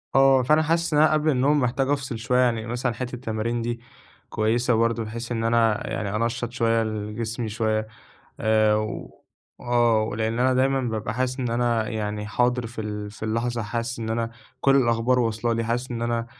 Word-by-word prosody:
آه، 135 -1 +6
فأنا 155 +5 +4
حاسس 165 +1 0
إن 150 - +4
أنا 155 0 +5
قبل 155 0 +2
النوم 145 +2 +3
محتاج 130 +1 0
أفصل 135 -5 -1
شويّة 125 +3 0
يعني، 115 -3 +2
مثلًا 120 +1 -1
حتّة 125 +2 -5
التمارين 115 -1 -2
دي 120 0 -3 0.5
كويّسة 120 +3 +1
برضه، 115 0 +1
بحيث 115 +2 -6
إن 115 -1 -1
أنا 115 -2 +2
يعني 100 -1 -3
أنشّط 115 +1 -1
شويّة 115 -1 +1
ال 105 -1 -4
جسمي 115 0 -3
شويّة، 110 0 -1 0.5
آآ 110 -1 +3 0.8
وآه، 120 -2 +2
ولإن 110 +1 -2
أنا 130 +1 +3
دايمًا 135 +1 +2
ببقى 110 -3 -3
حاسس 130 +2 -1
إن 125 -2 -1
أنا 115 -2 +1
يعني 105 -2 -3
حاضر 120 +2 +1
في 115 0 -7
ال 105 -1 -5
في 105 - -15
اللحظة، 115 +1 -1
حاسس 115 +3 -3
إن 110 -1 -4
أنا 115 0 -1 0.3
كل 135 0 +4
الأخبار 120 0 +2
وصلة 115 0 0
لي، 115 0 -1
حاسس 120 +3 -2
إن 115 -1 -3
أنا 115 0 -1
115 Hz, 185 wpm, -24 LUFS, 110-125 Hz, 0.8 s, آه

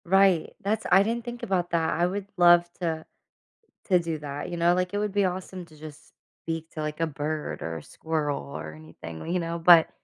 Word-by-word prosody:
Right, 190 -2 +4
that's 215 +2 -1
I 190 +2 +7
didn't 230 +2 -2
think 240 0 -7
about 180 -3 0
that. 165 -1 +1
I 175 - +3
would 195 +2 -3
love 175 0 +7 0.2
to 160 -2 -2 0.8
to 185 -3 +4
do 165 -2 -3
that, 145 0 -5
you 175 - -4
know, 170 +1 +4
like 180 +1 -1
it - - 0
would 210 0 -1
be 200 -1 +3
awesome 185 0 -4
to 155 - -18
just 150 0 -12 0.3
speak 165 0 -4
to 155 - -5
like 150 0 -4
a 165 - +1
bird 150 +1 -4
or 80 0 -4
a 80 - -9
squirrel 155 -3 -2
or 80 - -6
anything, 80 +1 -10
you 180 - +1
know? 170 0 -3
But 165 -1 +7
170 Hz, 215 wpm, -26 LUFS, 155-185 Hz, 0.8 s, I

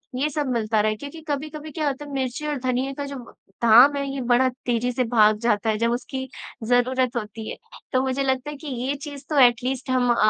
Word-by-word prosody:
ये 280 +4 0
सब 295 -1 -2
मिलता 220 -2 +1
रहे 215 0 +1
क्योंकि 285 +7 -9
कभी-कभी 305 +1 -4
क्या 305 -1 -2
होता 280 +1 -3
है 290 - -10
मिर्ची 265 +2 -2
और 295 -1 -1
धनिया 255 +1 -1
का 285 - -3
जो 280 0 -6 0.5
धाम 240 +5 +7
है 280 0 -1
ये 275 - -3
बड़ा 245 +1 +3 0.2
तेज़ी 245 0 0
से 250 +1 0
भाग 215 -2 +4
जाता 220 -2 +1
है 215 - +1
जब 230 +1 +1
उसकी 260 +2 -4 0.4
ज़रूरत 250 +1 +2
होती 220 -1 -5
है। - - -6 0.4
तो 255 - +3
मुझे 265 +1 -1
लगता 265 +1 -1
है 295 - -6
कि 305 - -10 0.2
ये 280 - 0
चीज़ 285 -2 -8
तो 300 -2 +2
एट 245 -1 +5
लीस्ट 260 +1 -3
हम 255 -1 +2
अ - - -2
255 Hz, 235 wpm, -24 LUFS, 240-280 Hz, 0.5 s, धाम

